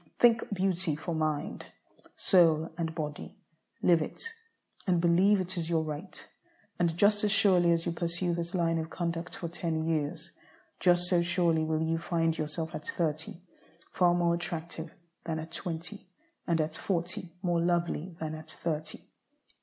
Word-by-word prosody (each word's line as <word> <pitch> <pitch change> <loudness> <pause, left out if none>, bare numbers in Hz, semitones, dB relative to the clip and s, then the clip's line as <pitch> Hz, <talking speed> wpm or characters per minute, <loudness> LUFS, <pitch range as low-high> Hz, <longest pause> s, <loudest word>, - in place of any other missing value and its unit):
Think 235 -2 +4
beauty 185 -4 0
for 165 +3 -4
mind, 155 -2 -2 0.5
soul, 165 -3 +4
and 165 -1 -3
body; 150 -2 -5 0.5
live 170 -2 +5
it, 455 - -4 0.5
and 180 -2 +3
believe 180 +4 +4
it 185 0 -2
is 165 0 -3
your 165 -2 +2
right. 155 +4 -6 0.5
And 170 -2 +1
just 205 +2 +4
as 210 - +3
surely 185 -5 +5
as 165 0 +1
you 175 - 0
pursue 170 +1 -1
this 170 +1 -3
line 165 -2 +2
of 160 0 -4
conduct 170 0 -3
for 170 - -4
ten 165 -1 -2
years, 160 0 -2 0.5
just 175 -1 +4
so 180 -1 +3
surely 170 -2 +2
will 155 0 0
you 165 0 0
find 165 -1 +1
yourself 155 +1 -3
at 155 -1 -6
thirty 160 +1 -2 0.5
far 175 -1 +4
more 170 -1 +3
attractive 165 -1 -4 0.3
than 165 -2 -2
at 160 +1 -6
twenty, 175 +3 -5 0.4
and 170 -1 +2
at 155 0 -1
forty 175 -1 -3
more 175 -2 +2
lovely 170 0 0
than 155 -1 -3
at 155 0 -8
thirty. 155 -1 -4
170 Hz, 160 wpm, -30 LUFS, 160-175 Hz, 0.5 s, live